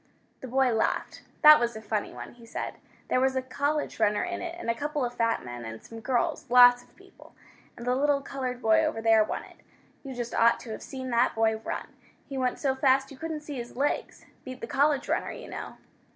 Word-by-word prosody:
The 260 - -8
boy 260 0 +2
laughed. 220 - -1 0.2
"That 305 0 +10
was 235 -1 -1
a - - -5
funny 210 -1 -2
one," - - -9
he 240 -1 -17
said. - - -5 0.3
"There - - +2
was 265 0 +2
a 260 - +1
college 285 +3 -2
runner 210 0 +2
in 355 -1 -4
it, 345 -1 -5
and 350 - -7
a 230 - +2
couple 295 +2 -2
of 240 - -4
fat 230 - 0
men, 120 -1 -7
and 110 0 -7
some 230 - -10
girls 250 +4 -1
lots 245 0 +8
of - - -24
people. - - -19 0.4
And 235 - -8
the 250 - +2
little 285 +1 +2
colored 255 -2 -5
boy 220 -1 +4
over - - -1
there 225 -1 +5
won - - -4
it. - - -16 0.5
You 270 -2 -7
just 240 -1 -4
ought 235 0 +4
to 230 - -8
have - - -6
seen 260 -2 -6
that 235 +1 +2
boy 220 0 +2
run! 220 - -5 0.4
He 275 - -7
went 255 -1 0
so 270 -2 0
fast 270 0 +2
you 275 - -11
couldn't 320 0 -5
see 295 -2 -7
his 240 0 -7
legs. 285 +2 -2 0.2
Beat 255 0 -8
the - - -5
college 280 +3 +1
runner, - - -1
you - - -8
know." - - -7
255 Hz, 230 wpm, -28 LUFS, 230-275 Hz, 0.5 s, That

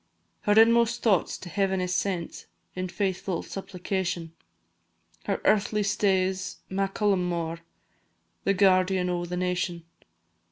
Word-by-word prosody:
Her 210 +1 +4
inmost 230 +1 +4
thoughts 200 -7 +2
to - - -10
Heaven 190 +2 0
is 180 0 -1
sent, 180 -3 -2 0.3
In 185 0 -3
faithful 190 -2 -2
supplication; 180 -3 -4 0.9
Her 200 - -1
earthly 210 0 +2
stay 195 -2 +2
's 185 0 -6
Macallummore, 185 -4 0 0.8
The 195 - +2
guardian 185 -1 +3
o' 175 0 -2
the 180 +1 -4
nation. 180 -1 -1
190 Hz, 115 wpm, -27 LUFS, 180-200 Hz, 0.9 s, Her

